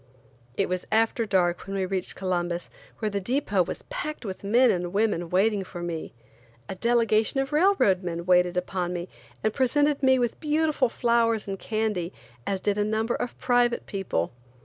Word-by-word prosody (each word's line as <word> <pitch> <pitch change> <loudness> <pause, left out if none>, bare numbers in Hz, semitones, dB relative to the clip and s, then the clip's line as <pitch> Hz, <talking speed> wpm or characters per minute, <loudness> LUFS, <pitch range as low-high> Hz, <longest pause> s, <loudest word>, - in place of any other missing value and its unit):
It - - +2
was 180 0 -3
after 225 +1 +2
dark 180 -2 +1
when 195 - -4
we 190 -1 0
reached 185 -1 -2
Columbus, 175 -2 -2 0.3
where 215 -2 -2
the 200 0 -2
depot 210 -3 +1
was 175 - -3
packed 305 - -4
with 190 -1 -6
men 240 +5 +4
and 175 -1 -2
women 200 -4 0
waiting 200 +3 +2
for 175 -2 -8
me. 170 -2 -4 0.6
A - - -4
delegation 230 +3 +2
of 270 +1 -2
railroad 305 - +4
men 170 -2 -4
waited 180 0 +3
upon 180 0 -2
me 175 0 -5 0.3
and 215 - +1
presented 290 +2 +2
me 260 -1 +5
with 240 -2 -1
beautiful 305 -4 +1
flowers 230 -3 +1
and 195 -1 -4
candy, 215 -6 -1 0.4
as 195 -1 0
did 205 +1 0
a - - +3
number 220 +2 0
of 245 - -4
private 245 -1 +2
people. 190 - -2
205 Hz, 175 wpm, -26 LUFS, 180-240 Hz, 0.6 s, me